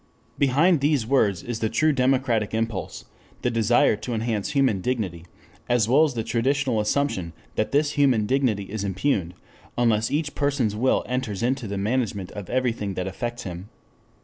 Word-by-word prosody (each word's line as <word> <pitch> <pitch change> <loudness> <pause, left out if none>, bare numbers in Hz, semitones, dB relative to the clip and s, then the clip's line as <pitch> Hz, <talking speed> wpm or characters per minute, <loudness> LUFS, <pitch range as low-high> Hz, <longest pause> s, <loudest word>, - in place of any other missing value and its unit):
Behind 145 +4 +3
these 145 -5 +2
words 110 -8 +2
is 120 -2 -4
the 110 - 0
true 155 +6 +2
democratic 125 -5 +1
impulse, 110 -3 -3 0.4
the 125 - +1
desire 115 0 +3
to 120 +2 -4
enhance 110 -2 -2
human 130 -9 +2
dignity, 95 -8 -3 0.4
as 120 -3 +3
well 135 +6 +5
as 140 -5 -3
the 115 - -1
traditional 130 +1 0
assumption 105 - -1 0.2
that 110 - -1
this 145 +1 +2
human 135 -7 +3
dignity 125 -5 +1
is 100 +1 -5
impugned, 95 -3 -1 0.4
unless 115 -2 +2
each 150 0 -1
person's 140 -7 0
will 125 +5 +2
enters 125 -5 -3
into 125 -1 0
the 100 0 -4
management 105 -3 -1
of 100 -3 -8
everything 115 -6 -1
that 90 - -2
affects 120 +5 -4
him. 90 +2 -7
115 Hz, 165 wpm, -24 LUFS, 105-135 Hz, 0.4 s, well